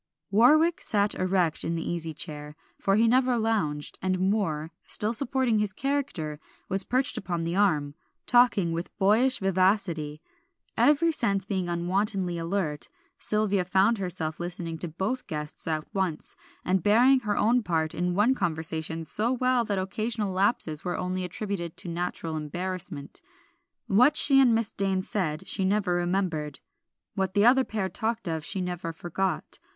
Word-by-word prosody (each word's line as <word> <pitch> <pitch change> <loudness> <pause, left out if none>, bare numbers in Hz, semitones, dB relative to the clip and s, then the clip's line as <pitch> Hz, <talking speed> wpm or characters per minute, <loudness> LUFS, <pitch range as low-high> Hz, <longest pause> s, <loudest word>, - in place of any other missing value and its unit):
Warwick 310 - +4
sat 205 -1 +1
erect 185 -3 0
in 165 - -2
the 165 - -4
easy 165 -2 -2
chair, 150 -1 -5 0.2
for 195 - +2
he 225 +2 +4
never 250 +1 +3
lounged; 205 -11 -1
and 185 -1 0
Moor, 185 -6 0 0.2
still 215 +2 0
supporting 250 -2 +1
his 210 -2 -1
character, 255 - -2 0.3
was 195 +1 +2
perched 255 +5 0
upon 175 -3 -3
the 170 +1 -2
arm, 155 -8 +2 0.3
talking 240 -8 +4
with 165 +2 -5
boyish 220 +7 +3
vivacity. 185 -5 0 0.6
Every 305 +3 +4
sense 200 - 0
being 190 -3 -2
unwontedly 180 +1 0
alert, 165 -3 -1 0.3
Sylvia 210 -3 +1
found 195 +5 +2
herself 170 -4 -3
listening 175 -2 -4
to 175 - -2
both 190 +10 -3
guests 150 -3 -5
at 155 -1 -1
once, 185 -5 -2 0.3
and 185 0 +1
bearing 245 +8 +5
her 210 -4 -2
own 240 +3 +3
part 160 -6 -1
in 180 0 -1
one 215 +6 +4
conversation 160 -4 -3
so 215 +9 0
well 255 -1 +2
that 205 -2 -1
occasional 210 +2 -2
lapses 185 -5 +1
were 180 - -2
only 185 0 -2
attributed 180 -2 -4
to - - -5
natural 170 -1 -3
embarrassment. 175 0 -5 0.6
What 250 +9 +4
she 280 -4 +7
and 245 -4 +5
Miss 225 -2 0
Dane 195 -1 -1
said 180 -3 -3
she 195 - 0
never 195 -1 +1
remembered; 175 -5 -1 0.5
what 190 -2 -2
the 205 +1 +4
other 260 +2 +6
pair 210 -6 -3
talked 225 +1 -3
of 160 -2 -2
she 190 - -2
never 180 -1 -4
forgot. 175 +3 -3
190 Hz, 155 wpm, -27 LUFS, 170-215 Hz, 0.6 s, she